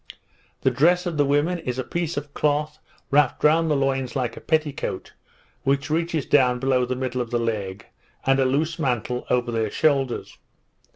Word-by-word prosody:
The - - +3
dress 180 +5 +3
of 170 -3 -3
the 145 - +3
women 145 +5 +1
is 125 -5 -4
a 130 - -1
piece 170 +3 -3
of 145 0 -5
cloth 150 +1 0 0.3
wrapped 145 -2 +3
round 160 +2 +4
the 150 - +2
loins 135 -3 -1
like 125 -3 -1
a - - -10
petticoat, 155 -3 -2 0.5
which 140 +2 0
reaches 165 -2 0
down 125 -3 +3
below 130 -1 +1
the 130 +1 -2
middle 130 -1 -2
of 120 - -4
the 120 - 0
leg, 105 -5 -3 0.4
and 135 0 +3
a 135 - +3
loose 155 +6 0
mantle 125 -3 -1
over 125 -1 +1
their 110 -2 0
shoulders. 135 -1 0
135 Hz, 180 wpm, -24 LUFS, 125-155 Hz, 0.5 s, round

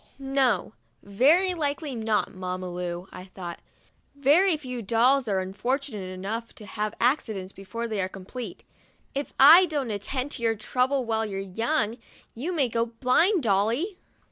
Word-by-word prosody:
" - - -33
No, 270 - +1 0.3
very 300 - +4
likely 295 -2 -2
not, 220 -3 -1
Mamma 185 -1 -5
Lu," 175 0 -5
I 185 0 -9
thought. 180 -2 -8 0.6
"Very 310 +6 +4
few 250 -4 -6
dolls 240 +5 +3
are 195 -2 +1
unfortunate 210 +1 -3
enough 205 +5 -5
to 215 - -11
have 210 +1 -3
accidents 220 -7 0
before 230 +5 -5
they 215 -3 -2
are 185 - -2
complete." 195 +6 -8 0.5
"If 280 +1 -3
I 330 +7 +9
don't 285 -7 -2
at 205 -1 -3
tend 265 +5 -3
to - - -4
your 225 -1 +2
trouble 250 +5 0
while 225 -1 0
your 195 -2 -4
young, 225 +4 -1 0.3
you 280 +10 -4
may 295 -7 +2
go 230 0 0
blind, 265 - +2
Dolly 230 - +1
230 Hz, 160 wpm, -26 LUFS, 195-275 Hz, 0.6 s, I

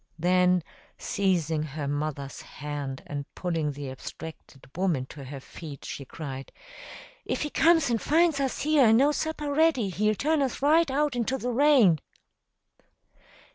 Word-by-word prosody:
Then, 180 +1 +3 0.3
seizing 170 -6 0
her 150 -1 -4
mother's 145 -1 -3
hand 145 -2 -6
and 145 -1 -5
pulling 165 -5 -1
the 140 -1 -6
abstracted 135 +1 -10
woman 175 -8 0
to 140 0 -10
her 135 +1 -7
feet, 145 0 -10
she 140 - -6
cried, 135 -2 -7 0.7
"If - - -2
he 300 - -4
comes 325 -5 +4
and 230 - 0
finds 320 -1 +3
us 270 -2 -1
here 295 -4 +5
and 220 +1 +6
no 280 +4 +4
supper 300 -1 -2
ready, 300 -9 +3
he'll 215 +3 +1
turn 305 +6 +1
us 270 -2 -1
right 310 +3 +4
out 290 0 0
into 245 +2 0
the 250 -1 -3
rain!" 245 - +5
185 Hz, 150 wpm, -27 LUFS, -, 0.7 s, and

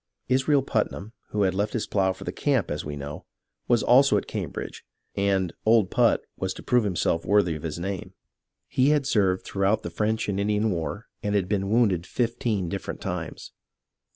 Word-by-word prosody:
Israel 135 +2 +3
Putnam, 110 -3 -2 0.2
who 105 -1 0
had 95 -1 +2
left 100 +3 -1
his 115 - -1
plough 95 -2 +1
for 95 - -8
the - - -3
camp, 135 - 0
as 75 - -3
we 75 0 -5
know, 70 +1 -7 0.4
was 120 -3 +3
also 135 +3 +5
at - - -2
Cambridge, - - -5 0.3
and 95 -3 +1
" - - -51
Old 110 -4 +4
Put" - - +3
was - - -3
to - - -10
prove 125 -2 +3
himself 85 -3 0
worthy 100 -5 +3
of 75 - -6
his 80 -1 -4
name. 95 +1 -5 0.5
He 130 +2 +2
had 150 -2 +2
served 95 -7 +1
throughout 100 +2 +1
the 85 - -5
French 110 +5 -1
and 100 -1 -1
Indian 105 +1 +1
war 90 +5 -3 0.2
and 105 0 -1
had 95 -3 +1
been 100 -1 -1
wounded 100 -6 +2
fifteen 115 -5 -1
different - - -5
times. - - -5
100 Hz, 190 wpm, -26 LUFS, 95-115 Hz, 0.5 s, also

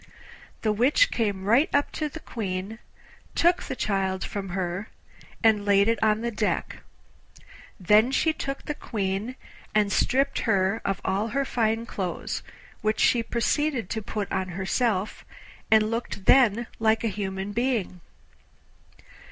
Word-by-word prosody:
The 215 - +2
Witch 260 - +3
came 205 -5 -1
right 240 +9 +4
up 285 - +2
to 305 -1 -3
the 320 +2 -9
Queen, 200 0 -4 0.6
took 345 +1 +3
the - - -5
child 190 -4 -1
from 195 -2 -5
her 180 +2 -3 0.5
and 220 -2 +4
laid 200 0 +4
it 230 -1 +1
on 215 0 +2
the 235 0 -2
deck; 210 -1 -2 1.0
then 210 +6 +5
she 315 +4 +2
took 275 -2 -5
the 300 - -2
Queen, 205 -1 -3 0.4
and 210 -1 +3
stripped 270 +7 +1
her 195 -1 +1
of 195 -1 -2
all 195 +3 0
her 275 +5 -1
fine 225 -2 0
clothes, 185 -6 -4 0.4
which 215 0 0
she 240 - +4
proceeded 240 0 -1
to 220 - -2
put 210 -1 -4
on 190 -1 -1
herself, 190 +3 -1 0.5
and 215 0 +4
looked 230 -4 -4
then 240 -3 +5
like 220 0 +2
a - - +1
human 195 -1 -3
being. 225 -6 -1
215 Hz, 145 wpm, -26 LUFS, 195-235 Hz, 1.0 s, then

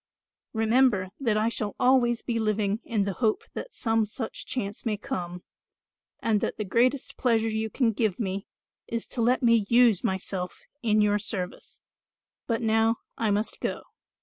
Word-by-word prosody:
Remember 225 -3 +3
that 230 -6 +1
I 215 +1 +2
shall 210 -3 -2
always 245 -2 +3
be 235 -2 -1
living 215 -1 0
in 215 -3 0
the 200 0 -2
hope 220 +1 +1
that - - -7
some 225 -2 +1
such 220 +2 -5
chance 200 -5 -3
may 215 -2 -1
come 175 -2 -5 0.8
and 215 -3 +1
that - - -2
the 215 - -2
greatest 250 +7 +1
pleasure 225 -3 +2
you 220 0 -1
can 235 0 +2
give 215 -2 0
me 195 -2 -3 0.4
is 230 -1 -3
to 245 - -3
let 250 +3 +2
me 230 -4 +4
use 235 -5 +5
myself 190 -1 -3 0.2
in 215 -2 +3
your 210 0 +3
service. 190 -4 -5 0.7
But 230 0 0
now 225 +1 +3 0.2
I 225 - 0
must 205 +2 0
go." - - -3
220 Hz, 165 wpm, -27 LUFS, 205-235 Hz, 0.8 s, use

